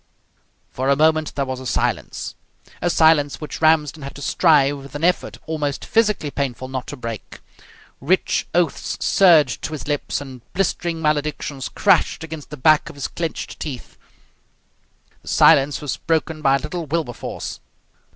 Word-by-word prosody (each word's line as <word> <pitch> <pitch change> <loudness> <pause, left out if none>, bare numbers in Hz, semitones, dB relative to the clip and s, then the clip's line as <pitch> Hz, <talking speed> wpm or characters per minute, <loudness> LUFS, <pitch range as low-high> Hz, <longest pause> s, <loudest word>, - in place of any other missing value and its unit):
For 130 +2 -2
a 140 - +5
moment 155 +1 +2
there 140 - 0
was 130 -1 -4
a 130 - -6
silence - - -2 0.5
a 175 - +1
silence 160 -4 +3
which 150 0 -7
Ramsden 155 -2 +3
had 140 0 -8
to 140 - -9
strive 145 -5 +3
with 140 +2 -12
an 145 - -5
effort 180 +1 +1
almost 150 -3 -3
physically 210 -9 +1
painful 130 -2 -3
not 130 -1 -4
to 145 - -7
break. 115 -4 -7 0.6
Rich 180 +8 +1
oaths 175 -2 0
surged 170 -6 +4
to 160 - -4
his 150 - -6
lips, 145 -1 -1
and 130 -3 -9
blistering 170 -3 -1
maledictions 150 -2 -1
crashed 190 -4 +2
against 160 -2 -8
the 150 - -8
back 155 +3 +4
of - - -11
his 140 - -3
clenched 165 -2 -5
teeth. 135 -6 -7 1.3
The - - -22
silence 140 +1 +4
was 145 -3 -3
broken 160 -1 -1
by 135 -2 +4
little 150 +4 -5
Wilberforce. 145 -5 -4
150 Hz, 155 wpm, -21 LUFS, 140-160 Hz, 1.3 s, a